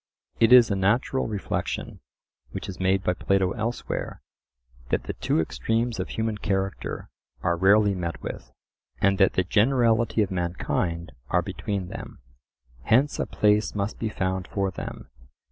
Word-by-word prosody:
It 115 Hz, -, +5 dB
is 125 Hz, -3 st, +8 dB
a -, -, +2 dB
natural 110 Hz, +7 st, +1 dB
reflection 105 Hz, -3 st, -3 dB, 0.5 s
which -, -, -6 dB
is 95 Hz, -, -7 dB
made 95 Hz, 0 st, +2 dB
by 90 Hz, -, +2 dB
Plato 95 Hz, +1 st, +1 dB
elsewhere, 115 Hz, +3 st, -4 dB, 0.7 s
that -, -, 0 dB
the -, -, -4 dB
two -, -, 0 dB
extremes 110 Hz, -, -1 dB
of 95 Hz, -, -3 dB
human 110 Hz, -1 st, -2 dB
character 95 Hz, -1 st, -3 dB, 0.3 s
are 85 Hz, -, +2 dB
rarely 100 Hz, +3 st, +4 dB
met 85 Hz, -3 st, -4 dB
with, -, -, -7 dB, 0.5 s
and 100 Hz, -1 st, +2 dB
that 95 Hz, -, +5 dB
the 95 Hz, -, +2 dB
generality 115 Hz, +1 st, +3 dB
of 95 Hz, -, -4 dB
mankind 85 Hz, -1 st, -2 dB, 0.2 s
are -, -, +2 dB
between 100 Hz, -3 st, -4 dB
them. -, -, -8 dB, 0.7 s
Hence 135 Hz, -, +3 dB
a -, -, -1 dB
place 105 Hz, 0 st, +2 dB
must 100 Hz, +1 st, -2 dB
be 110 Hz, -, -1 dB
found 95 Hz, -3 st, -2 dB
for 100 Hz, -1 st, -1 dB
them. 85 Hz, -, -8 dB
100 Hz, 150 wpm, -26 LUFS, 95-110 Hz, 0.7 s, is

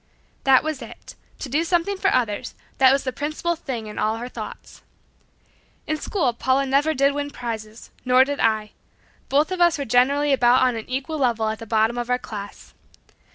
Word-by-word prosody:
That 265 Hz, -1 st, +5 dB
was 310 Hz, -3 st, -3 dB
it 235 Hz, -, -11 dB, 0.2 s
to -, -, -6 dB
do 290 Hz, +6 st, 0 dB
something 350 Hz, +3 st, 0 dB
for 380 Hz, -, +1 dB
others, 230 Hz, -5 st, -1 dB, 0.2 s
that 260 Hz, -1 st, +7 dB
was 275 Hz, +1 st, +1 dB
the 260 Hz, -, -2 dB
principal 305 Hz, +6 st, -2 dB
thing 260 Hz, -8 st, -5 dB
in 210 Hz, -, -7 dB
all 220 Hz, +1 st, 0 dB
her 240 Hz, +2 st, -6 dB
thoughts. -, -, -9 dB, 1.0 s
In 310 Hz, -, -1 dB
school 295 Hz, -, -1 dB
Paula 260 Hz, +3 st, +1 dB
never 285 Hz, +4 st, +1 dB
did 275 Hz, +1 st, +3 dB
win 290 Hz, 0 st, -3 dB
prizes 225 Hz, -4 st, -7 dB
nor 255 Hz, 0 st, +5 dB
did 285 Hz, +1 st, -4 dB
I. 215 Hz, -2 st, +1 dB, 0.6 s
Both 295 Hz, +5 st, +2 dB
of 370 Hz, -1 st, -2 dB
us 345 Hz, -2 st, +4 dB
were 280 Hz, -, -3 dB
generally 275 Hz, +5 st, +3 dB
about 245 Hz, 0 st, +4 dB
on 250 Hz, -2 st, +2 dB
an 225 Hz, +1 st, -7 dB
equal 270 Hz, +4 st, -3 dB
level 230 Hz, -4 st, +1 dB
at 220 Hz, -, -4 dB
the 225 Hz, -, -9 dB
bottom 225 Hz, +2 st, +1 dB
of 240 Hz, 0 st, -4 dB
our 250 Hz, -, +2 dB
class. 205 Hz, -4 st, -9 dB
260 Hz, 195 wpm, -23 LUFS, 230-290 Hz, 1.0 s, that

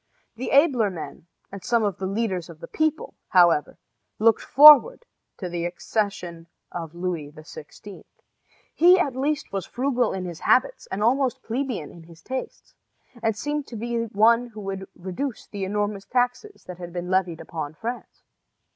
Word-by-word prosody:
The 250 Hz, +3 st, -5 dB
abler 270 Hz, -7 st, +4 dB
men, 170 Hz, -2 st, -9 dB, 0.2 s
and 195 Hz, -2 st, -9 dB
some 235 Hz, -2 st, +1 dB
of 200 Hz, -3 st, -1 dB
the 190 Hz, -, -2 dB
leaders 195 Hz, -4 st, -2 dB
of 165 Hz, -2 st, -12 dB
the -, -, -9 dB
people, 315 Hz, 0 st, -1 dB
however, 170 Hz, -5 st, +3 dB, 0.4 s
looked 225 Hz, +1 st, +3 dB
forward 305 Hz, -, +7 dB, 0.3 s
to 185 Hz, -, -5 dB
the 175 Hz, -1 st, -4 dB
accession 175 Hz, -2 st, -3 dB, 0.2 s
of 165 Hz, -2 st, -7 dB
Louis 170 Hz, -5 st, -4 dB
XVI. 155 Hz, +5 st, -12 dB, 0.7 s
He 360 Hz, +3 st, +6 dB
at 285 Hz, -8 st, 0 dB
least 290 Hz, +3 st, -2 dB
was 195 Hz, -3 st, -3 dB
frugal 250 Hz, -2 st, 0 dB
in 185 Hz, -1 st, -4 dB
his 175 Hz, -2 st, -7 dB
habits -, -, +1 dB
and 210 Hz, -, -3 dB
almost 255 Hz, +1 st, +1 dB
plebeian 235 Hz, -, -3 dB
in 170 Hz, -, -13 dB
his 165 Hz, -1 st, -17 dB
tastes, 260 Hz, 0 st, -7 dB, 0.5 s
and 225 Hz, -2 st, 0 dB
seemed 295 Hz, +2 st, -3 dB
to 235 Hz, -, -9 dB
be 230 Hz, +1 st, -2 dB
one 230 Hz, +3 st, +3 dB
who 215 Hz, -3 st, -10 dB
would 195 Hz, -1 st, -5 dB
reduce 190 Hz, +8 st, -5 dB
the 200 Hz, -2 st, -5 dB
enormous 205 Hz, 0 st, -2 dB
taxes 250 Hz, -, -1 dB
that 180 Hz, -1 st, -10 dB
had 175 Hz, -1 st, -8 dB
been 175 Hz, +1 st, -5 dB
levied 185 Hz, -3 st, 0 dB
upon 155 Hz, -2 st, -6 dB
France. 240 Hz, +7 st, -7 dB
210 Hz, 165 wpm, -24 LUFS, 175-250 Hz, 0.7 s, forward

